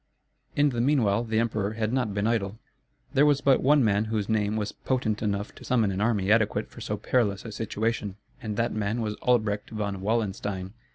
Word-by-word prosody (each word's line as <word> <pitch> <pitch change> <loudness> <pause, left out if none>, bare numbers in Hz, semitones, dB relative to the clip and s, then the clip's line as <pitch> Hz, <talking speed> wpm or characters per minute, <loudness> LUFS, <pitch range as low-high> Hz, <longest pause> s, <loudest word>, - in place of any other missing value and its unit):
In 145 0 +4
the 120 -3 -1
meanwhile 120 -6 +2
the 110 -2 -1
emperor 110 -3 0
had 110 +1 -2
not 125 -5 0
been 100 +1 -1
idle. 110 -2 0 0.6
There 140 - +5
was 145 -2 +4
but 135 -2 +3
one 145 0 +4
man 105 -1 +2
whose 110 -2 -2
name 105 -1 +1
was 105 -1 -2
potent 125 -5 -1
enough 100 -1 -2
to - - -14
summon 115 -5 +2
an 95 +1 -2
army 105 -3 +1
adequate 110 -1 +2
for - - -11
so - - -3
perilous 105 -5 0
a 115 - -6
situation; 110 -1 -2 0.3
and 105 -2 -4
that 115 0 0
man 110 +2 -1
was 105 -1 -2
Albrecht 110 -4 +1
von 100 -3 -3
Wallenstein. 100 -3 -2
110 Hz, 195 wpm, -27 LUFS, 100-115 Hz, 0.6 s, There